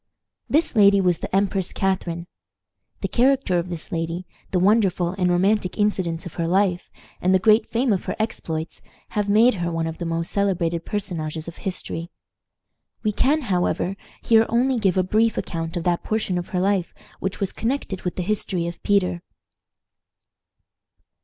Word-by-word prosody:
This 310 -2 +2
lady 200 -2 +6
was 180 -3 +2
the - - -4
Empress 195 -1 +1
Catharine. 180 -3 -1 0.8
The - - 0
character 255 -7 +2
of 170 +1 -4
this 170 -3 -6
lady, 165 +2 -3 0.2
the 185 - 0
wonderful 190 -2 +3
and 180 -1 0
romantic 190 +1 +1
incidents 185 -6 0
of 175 - -7
her 165 - 0
life, 185 0 +1 0.3
and 185 +1 +3
the - - +4
great 215 +3 +4
fame 240 0 +2
of 190 - -2
her - - -2
exploits, 165 -7 -3 0.3
have 205 -1 -1
made 225 +5 +5
her 170 0 -1
one 165 0 -1
of 160 0 -5
the 175 - -3
most 165 +1 -2
celebrated 175 -4 0
personages 165 -6 -4
of 170 - -8
history. 175 -3 -4 0.9
We 215 - +2
can, 285 +9 +2
however, 185 -3 0 0.3
here 225 -1 +5
only 250 +2 +2
give 190 -4 +2
a 185 - +4
brief 220 +4 +2
account 165 0 -3
of 170 - -2
that 175 0 +1
portion 215 -5 -1
of 175 - -7
her 180 - -1
life 190 -2 0 0.2
which 190 +1 -3
was 195 - -2
connected 225 -6 -2
with 180 - -3
the 180 - -2
history 190 -3 -1
of 170 0 -6
Peter. 185 -4 +1
185 Hz, 170 wpm, -23 LUFS, 170-210 Hz, 0.9 s, lady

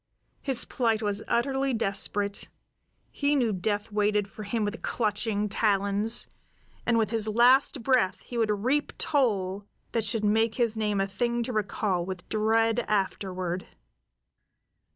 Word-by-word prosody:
His 265 -4 +2
plight 225 -3 0
was 205 0 -1
utterly 270 +1 0
desperate; 200 -1 0 0.6
he 285 0 +1
knew 240 -6 +1
death 205 +3 -2
waited 210 -1 +1
for 210 - -11
him 210 +1 -1
with 205 +2 -4
clutching 210 -1 -1
talons, 205 +1 +1 0.6
and 235 -1 +3
with 220 -1 +1
his 220 -2 +1
last 245 +4 +4
breath 225 -9 +2
he 245 - -10
would 225 -2 +1
reap 250 +8 0
toll 205 -9 0 0.3
that 230 - 0
should 215 0 0
make 225 +2 +2
his 235 -3 +1
name 210 -2 0
a 195 - +2
thing 235 +4 -1
to 250 - -4
recall 200 -3 -1
with 185 0 -7
dread 225 +1 +2
afterward. 185 -3 -2
215 Hz, 140 wpm, -27 LUFS, 200-235 Hz, 0.6 s, last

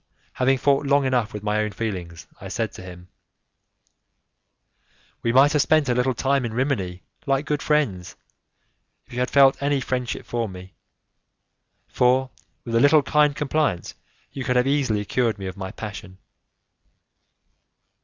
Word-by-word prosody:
Having 130 +1 +2
fought 140 +1 +1
long 140 0 +3
enough 125 -4 0
with 105 -1 -7
my 105 0 0
own 105 0 0
feelings, 90 -6 -5
I - - -8
said - - -3
to - - -11
him; 90 -1 -11 2.1
"We 115 - 0
might 135 +4 +5
have 150 - +3
spent 145 +1 +2
a - - +3
little 125 +1 0
time 135 +2 +1
in 115 -2 -4
Rimini 100 -9 -2 0.2
like 135 +1 +1
good 150 -1 -1
friends, 115 -13 -1 0.9
if - - -17
you 125 - -3
had 125 - 0
felt 135 -1 +5
any 140 0 +1
friendship 125 -1 -3
for 115 -2 -2
me, 95 0 -11 1.1
for, 130 +1 +2 0.3
with 115 - -5
a 115 - +4
little 145 +3 +5
kind 150 +1 +2
compliance, 145 - -1 0.4
you 135 - -5
could 125 0 -1
have 125 0 +3
easily 130 -7 0
cured 115 0 0
me 95 - -7
of 95 -1 -5
my 95 -2 -6
passion." 100 -2 -8
125 Hz, 155 wpm, -23 LUFS, 105-140 Hz, 2.1 s, might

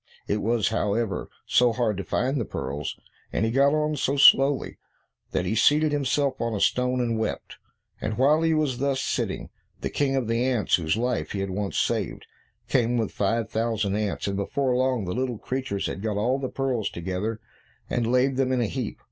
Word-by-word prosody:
It 105 +1 0
was, 115 -1 +1
however, 105 -2 -1 0.2
so 120 -1 +4
hard 115 -3 0
to 100 - -3
find 130 +7 0
the - - 0
pearls, 70 -6 -5 0.3
and 110 - 0
he 115 - 0
got 140 +3 +4
on 155 0 0
so 140 0 0
slowly, 135 0 +5 0.5
that 90 - -1
he 90 - 0
seated 150 +7 +4
himself 140 -1 0
on 115 -1 -1
a - - -2
stone, 125 +4 +1
and 115 -2 0
wept. 110 - -4 0.4
And 110 0 -2
while 145 +5 +4
he 165 -1 +2
was 145 -5 0
thus 140 -1 0
sitting, - - -2 0.3
the - - -3
King 135 -2 +1
of 130 -4 0
the 115 +1 +1
ants 125 -5 +2
whose 80 +3 0
life 115 -10 -1
he 100 - -2
had 95 -1 -3
once 100 +1 -3
saved, - - -1 0.4
came 120 -2 +2
with 110 -3 -1
five 110 +2 -1
thousand 110 -3 0
ants, 105 -1 -2
and 100 - -1
before 125 +6 0
long 130 -4 +1
the 90 - -3
little 125 -1 -2
creatures 125 -5 -3
had 95 - -4
got 105 -1 -2
all 125 +6 +1
the 130 -2 -3
pearls 130 -5 -1
together, 95 +6 -3 0.5
and 120 -1 0
laid 130 +1 +2
them 130 -1 +1
in 130 - +1
a - - +2
heap. 120 0 -4
120 Hz, 200 wpm, -25 LUFS, 105-130 Hz, 0.5 s, slowly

